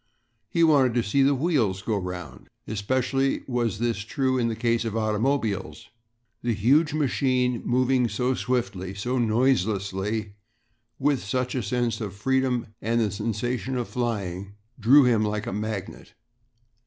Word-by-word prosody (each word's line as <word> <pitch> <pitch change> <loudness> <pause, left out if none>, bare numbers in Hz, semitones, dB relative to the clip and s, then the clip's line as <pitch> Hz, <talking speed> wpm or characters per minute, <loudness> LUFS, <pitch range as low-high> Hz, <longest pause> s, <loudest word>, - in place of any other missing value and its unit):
He 170 - +2
wanted 135 -7 +4
to 120 - +2
"see 125 +7 +1
the 140 +1 +4
wheels 125 - 0
go 110 - 0
'round." 90 -8 -6 0.2
Especially 130 +6 0
was 120 -5 -1
this 115 0 -1
true 130 +3 0
in 120 - +1
the 115 - -2
case 115 0 +1
of 115 -1 -3
automobiles. 110 -1 -1 0.5
The 120 -2 0
huge 140 +10 +3
machine 130 -4 +1
moving 125 0 +2
so 125 +5 0
swiftly, 100 -8 -2
so 125 +6 -1
noiselessly, 110 -3 0 0.6
with 140 -1 +1
such 125 +5 -2
a 130 - -1
sense 120 +2 -1
of 100 -3 -5
freedom 125 0 0
and 115 +2 +1
the 110 -3 +1
sensation 120 +5 -2
of 120 - -2
flying, 100 -5 -3 0.3
drew 130 +6 +7
him 115 -4 +3
like 105 0 -2
a - - -4
magnet. 105 -1 -5
115 Hz, 145 wpm, -25 LUFS, 105-130 Hz, 0.6 s, drew